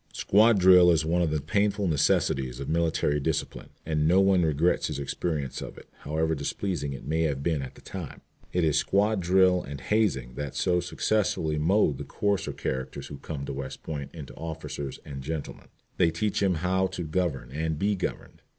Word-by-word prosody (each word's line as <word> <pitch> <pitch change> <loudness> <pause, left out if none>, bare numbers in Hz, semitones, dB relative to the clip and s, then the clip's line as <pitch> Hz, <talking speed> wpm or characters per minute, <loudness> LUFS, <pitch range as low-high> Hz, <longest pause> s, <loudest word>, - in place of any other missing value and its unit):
Squad 110 +2 +4
drill 90 -1 +7
is 80 -2 +3
one 85 +2 +1
of 85 - +2
the 75 0 0
painful 100 +6 0
necessities 65 -4 +1
of 70 - -5
military 80 -2 +1
discipline, 75 +1 -3 0.2
and 75 -1 +1
no 90 +3 +5
one 95 -2 +4
regrets 80 +2 +2
his 75 - -4
experience 70 -1 -3
of - - -8
it, - - -13
however 80 +2 -1
displeasing 75 +1 -3
it 65 - -9
may 80 +3 0
have 70 -4 -1
been 80 -3 0
at 65 - -7
the - - -15
time. 90 -6 -8 0.3
It 90 - +1
is 80 -1 +3
squad 105 +2 +2
drill 90 0 +4
and 70 +1 -7
hazing 65 - 0
that 70 +1 -5
so 90 -1 +2
successfully 90 -4 0
mould 80 -3 +2
the - - -4
coarser 100 -2 -1
characters 65 0 -4
who 70 - -7
come 70 -1 -6
to 70 - -4
West 65 -1 -6
Point 70 -3 -5
into 80 -5 -9
officers 75 -3 -6
and 70 -2 -7
gentlemen. 75 +2 -6 0.3
They 85 - +4
teach 100 +7 -1
him 95 -3 +2
how 95 +3 +1
to 95 -1 -5
govern 75 -6 -2
and 80 +2 -2
be 100 +5 +1
governed. 95 - -5
80 Hz, 190 wpm, -27 LUFS, 70-90 Hz, 0.3 s, drill